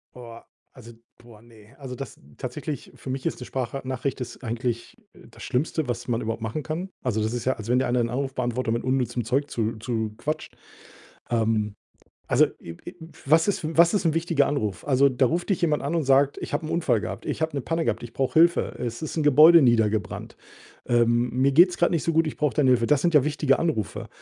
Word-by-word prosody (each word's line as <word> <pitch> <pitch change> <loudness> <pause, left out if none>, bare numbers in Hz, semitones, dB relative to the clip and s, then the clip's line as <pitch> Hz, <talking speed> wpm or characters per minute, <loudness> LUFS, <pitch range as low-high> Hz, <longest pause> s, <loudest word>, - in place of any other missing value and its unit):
Boah, 115 -2 -11 0.3
also 120 -3 -13 0.2
boah, 115 -3 -17
ne? 115 -2 -19
Also, 135 -3 -8
das 135 0 -8 0.2
tatsächlich, 140 +3 -6
für - - -10
mich 130 0 -4
ist - - -2
'ne - - -6
Spracha 130 +1 -4
Nachricht 130 +1 -3
ist 125 +1 -7
eigentlich, 120 0 -3 0.2
äh, - - -17
das - - -13
Schlimmste, 145 +2 -1
was 120 - -3
man 120 -2 -1
überhaupt 115 +1 -4
machen 115 +7 -4
kann. 170 +5 -4
Also, 115 -4 0
das 110 +2 -1
ist 120 -2 -3
ja, 130 - +1
als 110 - -8
wenn 125 +2 +3
dir - - 0
einer 125 0 +1
'n 115 -1 0
Anrufbeantworter 125 -2 -2
mit 115 +2 -2
unnützem 125 -3 -1
Zeug 140 +5 0
zu 115 0 -1
zuquatscht. 110 +5 -4 0.7
Ähm, 110 -3 0 0.5
also, - - +4 0.2
i 85 - -8
i 175 - -8 0.3
was 160 +5 +4
ist 205 - -1
f 155 - -2
was 170 +3 +6
ist 205 - +1
'n 160 - +3
wichtiger 165 -3 +1
Anruf? 105 -10 -3
Also, 140 0 +4
da 130 0 +2
ruft 175 - -2
dich 195 - 0
jemand 155 -4 +1
an 145 +5 -2
und 165 - +1
sagt: 135 +1 +3
„Ich - - -6
habe 150 +2 -1
'n - - -5
Unfall 170 0 +1
gehabt. - - -6
Ich - - -4
habe 160 -1 -1
'ne 140 - -1
Panne 165 +5 -2
gehabt. - - -1
Ich 120 - -8
brauche 135 -1 -2
Hilfe. 170 +2 +4
Es 120 +1 -4
ist 155 - -5
'n 155 - +1
Gebäude 155 +4 +7
niedergebrannt. 110 -5 +1 0.5
Ähm, 120 0 +2
mir 130 +3 +2
geht 175 +5 +7
's 175 - -7
gerade 175 - +2
nicht 165 - 0
so 165 - +1
gut, 165 0 +2
ich 155 - -5
brauche 150 -3 0
deine 140 -4 +3
Hilfe.“ 115 -2 +3
Das 145 +2 +2
sind 170 +1 +1
ja 150 -4 +6
wichtige 145 -2 +1
Anrufe. 155 - -2
130 Hz, 230 wpm, -25 LUFS, 120-150 Hz, 0.7 s, Gebäude